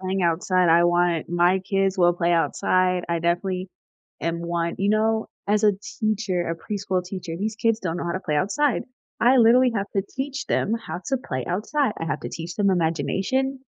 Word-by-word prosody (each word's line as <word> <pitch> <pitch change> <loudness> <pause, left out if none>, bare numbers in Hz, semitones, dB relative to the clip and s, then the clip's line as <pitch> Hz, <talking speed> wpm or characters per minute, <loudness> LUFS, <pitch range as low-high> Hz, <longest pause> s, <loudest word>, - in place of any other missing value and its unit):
Playing 190 0 -2
outside, 180 +2 +2
I 170 +1 +5
wanted 175 -2 +1
my 175 +2 +3
kids 195 0 0
will 175 0 +5
play 175 0 0
outside. 180 +2 +1
I 170 - 0
definitely 180 +2 -1 0.5
am 170 0 -1
one 170 0 -2
you 200 +1 +1
know, 220 +1 +1 0.2
as 210 +1 +2
a 210 - +6 0.3
teacher, 205 -6 0
a - - -1
preschool 190 0 -3
teacher, 180 -2 -6
these 215 +2 -2
kids 225 -1 +1
don't 170 -2 -2
know - - -4
how 170 - -2
to 185 - -3
play 150 - -1
outside. 240 - +1 0.4
I 250 +3 +5
literally 240 +2 +5
have 200 -1 -1
to 195 - +2
teach 275 +1 -3
them 215 - 0
how 175 - -5
to 270 - +1
play 130 - -4
outside. 215 +8 0
I - - -2
have - - -2
to - - -5
teach 165 +1 -6
them 200 -2 +2
imagination. 190 - 0
185 Hz, 195 wpm, -24 LUFS, 170-215 Hz, 0.5 s, a